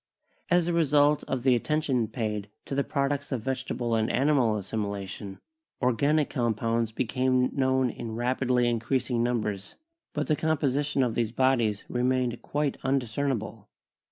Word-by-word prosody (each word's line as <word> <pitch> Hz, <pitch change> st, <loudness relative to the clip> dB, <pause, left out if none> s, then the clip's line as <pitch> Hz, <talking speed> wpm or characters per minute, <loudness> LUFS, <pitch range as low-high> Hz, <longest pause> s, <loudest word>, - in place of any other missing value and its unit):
As 175 Hz, -1 st, +3 dB
a 175 Hz, -, 0 dB
result 150 Hz, -2 st, +3 dB
of 130 Hz, -2 st, -3 dB
the 130 Hz, -1 st, +5 dB
attention 130 Hz, -2 st, +1 dB
paid 105 Hz, -3 st, -3 dB, 0.2 s
to -, -, -6 dB
the 140 Hz, +1 st, +1 dB
products 140 Hz, +1 st, -1 dB
of 125 Hz, -5 st, -2 dB
vege 130 Hz, 0 st, -2 dB
table 120 Hz, -1 st, -2 dB
and 110 Hz, -1 st, +1 dB
animal 130 Hz, -5 st, +2 dB
assimilation, 100 Hz, -1 st, -4 dB, 0.4 s
organic 140 Hz, +4 st, +2 dB
compounds 115 Hz, -1 st, 0 dB
became 130 Hz, +2 st, +1 dB
known 130 Hz, -2 st, +2 dB
in 115 Hz, -2 st, -6 dB
rapidly 125 Hz, 0 st, +1 dB
increasing 120 Hz, +1 st, 0 dB
numbers, 105 Hz, -5 st, -2 dB, 0.4 s
but 150 Hz, 0 st, -1 dB
the 155 Hz, -, +2 dB
composition 145 Hz, -2 st, +1 dB
of 120 Hz, -3 st, 0 dB
these 115 Hz, -1 st, 0 dB
bodies 120 Hz, -4 st, +1 dB
remained 125 Hz, -1 st, 0 dB
quite 145 Hz, -1 st, -1 dB
undiscernible. 125 Hz, -4 st, -2 dB
125 Hz, 140 wpm, -27 LUFS, 115-140 Hz, 0.4 s, the